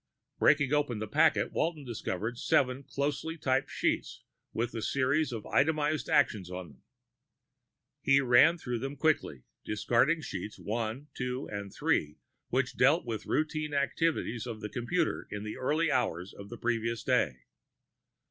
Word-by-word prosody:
Breaking 145 -1 +4
open 145 -6 +1
the 110 +1 -4
packet, 155 +9 +3
Walton 160 -4 -1
discovered 115 0 -4
seven 130 +1 +2
closely 145 +4 -3
typed 135 -3 0
sheets - - -1 0.3
with 120 +1 -2
a 115 - -3
series 140 +5 +1
of 110 -3 -5
itemized 155 +1 +1
actions 110 -10 +2
on 90 -2 -6
them. 70 - -20 1.2
He 140 0 +5
ran 135 +6 +5
through 125 -7 -3
them 135 +3 -4
quickly, 140 - 0 0.2
discarding 120 +9 +2
sheets 105 - -6
one, 115 +6 -3
two, 125 +1 -3
and 100 -1 -5
three, 75 -4 0 0.3
which 130 +1 0
dealt 145 +7 +4
with 110 -3 -4
routine 155 -1 -1
activities 140 -4 0
of 110 -2 -6
the 105 - -4
computer 155 - -1
in 105 0 -5
the 105 - -5
early 155 +5 +1
hours 100 -8 -1
of 100 0 -10
the 120 - -7
previous 115 -1 -1
day. 65 0 +1
125 Hz, 150 wpm, -30 LUFS, 110-145 Hz, 1.2 s, He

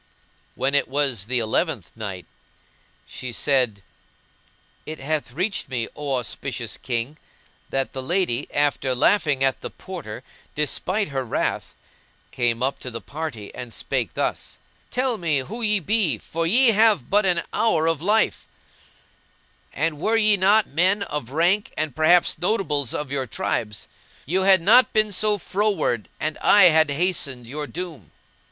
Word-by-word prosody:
When 135 +2 0
It 145 - +3
was 135 -7 0
the 125 +1 0
Eleventh 115 - -1
Night, 100 -5 -6 0.8
She 125 -1 -7
said, 125 -6 +1 1.0
It 155 +1 -6
hath 145 -1 -2
reached 185 - -2
me, 120 -3 -2
O 145 -2 -2
auspicious 120 -1 -3
King, 125 +4 -3 0.5
that 135 0 -2
the 130 - -4
lady, 145 -4 -1
after 145 -3 +1
laughing 145 -1 +2
at 135 -1 +1
the - - -5
Porter 150 - -8 0.3
despite 185 +7 -1
her 135 -2 -2
wrath, 120 - -2 0.6
came 120 -1 0
up 135 +1 -1
to 125 - -6
the 115 -1 -6
party 140 -8 -7
and 125 -2 -8
spake - - -3
thus, - - -3 0.3
"Tell 250 -2 -1
me 160 -4 +1
who 195 - -4
ye 210 -2 +2
be, 190 - +1
for 165 +8 -3
ye 245 +7 +5
have 215 - +3
but 205 0 +3
an 175 -2 +1
hour 165 -9 +2
of 165 -2 0
life; 210 +5 +1 1.2
and 155 0 -2
were 220 +7 +1
ye 215 -2 +5
not 200 +3 +4
men 185 +7 +1
of 150 -10 -5
rank 175 +8 +1
and, 155 -4 -2
perhaps, 155 +1 +4
notables 165 - 0
of 150 -2 -4
your 135 -2 -2
tribes, 105 -1 -3 0.4
you 180 +7 0
had 190 -2 +5
not 230 +5 +5
been 215 -1 +2
so 210 +2 +1
froward 190 - -1
and 155 0 -3
I 200 -4 +7
had 160 -1 +4
hastened 145 -5 -1
your 145 +5 -5
doom." 165 - -7
155 Hz, 150 wpm, -23 LUFS, 130-190 Hz, 1.2 s, I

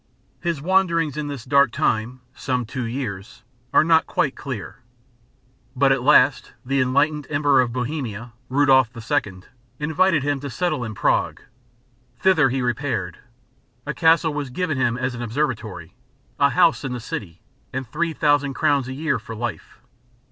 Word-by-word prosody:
His 170 -5 -3
wanderings 170 -5 +2
in 150 -1 -3
this 140 -5 -6
dark 140 -2 +4
time 115 +4 -1
some 125 -3 -2
two 125 +2 -4
years 115 -4 -6 0.3
are - - +5
not 160 0 +3
quite 140 - 0
clear; 130 -5 -7 1.0
but 135 +1 +3
at 135 -2 +2
last 145 0 +4
the 135 +1 +1
enlightened 140 +3 +1
Emperor 145 -2 +3
of 120 -2 -1
Bohemia, 120 -3 -4 0.2
Rudolph 130 -2 +4
II., 100 -4 -2 0.3
invited 160 +1 +1
him 145 -1 0
to 140 +1 -6
settle 155 -2 -1
in 110 -2 -6
Prague. - - 0 0.8
Thither 160 -8 +4
he 130 0 -1
repaired, 120 - -2 0.7
a 150 - -3
castle 160 -1 +3
was 145 -2 -4
given 160 +3 -2
him 120 -2 +1
as 130 0 -2
an 120 - -6
observatory, 110 - -3 0.5
a - - +5
house - - +3
in 130 - -3
the 125 - -4
city, 90 -6 -7 0.3
and 130 +1 -4
3000 145 -2 0
crowns 140 -1 +1
a 130 - -5
year 155 +4 -1
for 115 - -9
life. 120 -1 -6
135 Hz, 155 wpm, -22 LUFS, 120-150 Hz, 1.0 s, are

